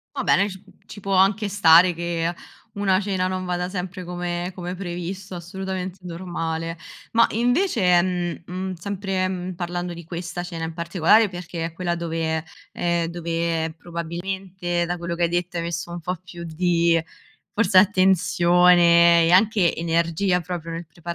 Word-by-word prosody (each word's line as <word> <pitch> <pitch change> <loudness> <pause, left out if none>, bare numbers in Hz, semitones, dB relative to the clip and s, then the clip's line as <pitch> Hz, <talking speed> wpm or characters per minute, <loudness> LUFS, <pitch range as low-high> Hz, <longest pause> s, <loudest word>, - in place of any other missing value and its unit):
Va - - -2
bene, 200 +1 +3
ci 190 -1 -10 0.3
ci 205 - -10
può 195 0 -2
anche 195 +3 +3
stare 180 -2 +6
che 170 0 -2 0.4
una 195 -2 +2
cena 190 -2 -1
non 185 0 -3
vada 180 0 -2
sempre 185 0 -5
come 175 0 -4
come 180 -1 -5
previsto, 185 +1 -6
assolutamente 185 +1 -5
normale. 165 -2 -4 0.3
Ma, 230 0 +5
invece, 245 - +1
ehm, 180 -1 +2
mhmm, 185 +2 -5
sempre, 190 +1 -2
mhmm, 185 0 -4
parlando 175 0 -4
di 170 0 -9
questa 170 +1 -5
cena 170 -2 -6
in 160 - -6
particolare 170 +6 +3
perché 175 -2 -5
è 165 - -6
quella 175 0 -2
dove, 165 -2 -2 0.3
ehm, 170 -1 0
dove, 165 -1 -2
probabilmente, 175 +1 -4
da 175 +1 -2
quello 170 0 -4
che 170 - -1
hai 170 - +2
detto, 175 +1 -2
hai 170 - -2
messo 170 +1 -4
un 175 - -5
po' 180 +3 -2
più 175 -1 -11
di 170 0 +2 0.5
forse 200 -3 +3
attenzione 175 -3 +5
e 165 - +2
anche 195 -1 +4
energia 170 +2 +1
proprio 170 -1 -5
nel 165 0 -6
prepa 170 +2 -7
175 Hz, 160 wpm, -23 LUFS, 170-185 Hz, 0.5 s, stare